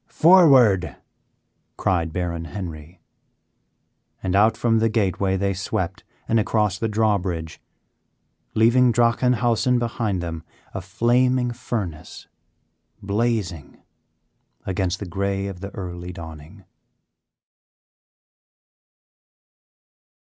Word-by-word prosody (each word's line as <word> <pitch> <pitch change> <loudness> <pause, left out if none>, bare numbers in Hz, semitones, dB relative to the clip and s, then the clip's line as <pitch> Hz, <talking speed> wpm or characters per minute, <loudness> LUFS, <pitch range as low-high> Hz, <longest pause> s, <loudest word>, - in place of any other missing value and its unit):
"Forward!" 130 - +5 0.8
cried 85 -3 0
Baron 85 -1 -3
Henry, 85 -2 -8 1.2
and 95 -1 -1
out 110 +2 +4
from 115 -2 +2
the 115 0 +2
gateway 100 -3 0
they 100 +1 0
swept 95 +2 -3 0.2
and 115 - +2
across 105 -2 0
the 115 - 0
drawbridge, 100 -7 -1 0.9
leaving 120 +3 +4
Drachenhausen 120 +1 +2
behind 115 -4 -2
them 85 -2 -5 0.3
a 100 - -4
flaming 120 +5 +1
furnace 100 -10 -6 0.8
blazing 100 -6 -2 0.9
against 95 -1 -1
the 100 - -6
gray 100 +2 -2
of 95 -3 -6
the 100 +1 -6
early 90 -2 -6
dawning. 80 -3 -11
100 Hz, 90 wpm, -22 LUFS, 90-115 Hz, 1.2 s, Forward